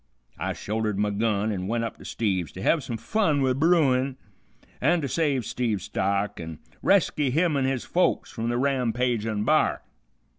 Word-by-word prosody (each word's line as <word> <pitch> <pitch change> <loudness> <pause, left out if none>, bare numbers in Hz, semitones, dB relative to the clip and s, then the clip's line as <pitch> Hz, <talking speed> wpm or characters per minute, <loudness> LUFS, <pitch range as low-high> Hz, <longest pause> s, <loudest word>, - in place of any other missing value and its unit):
I - - -2
shouldered 105 -1 -2
my 105 0 +1
gun 105 0 0
an' 95 -2 -3
went 115 +2 0
up 115 - -4
to - - -13
Steve's 95 -7 -1
to 95 - -8
hev 160 -4 +2
some 115 -2 -4
fun 155 - +1
with 130 0 +1
bruin, 140 -5 +3 0.6
an' 170 +6 +3
to 140 - -2
save 140 -4 0
Steve's 115 -5 -1
stock, 100 +1 -1
an' 80 -2 -6 0.2
resky 150 -7 +3
him 160 +4 +2
an' 135 -2 +1
his 130 -2 -1
folks 180 - +1
from 115 0 -3
the 120 - 0
rampagin' 120 -5 0
b'ar. - - +2
120 Hz, 175 wpm, -26 LUFS, 105-140 Hz, 0.6 s, bruin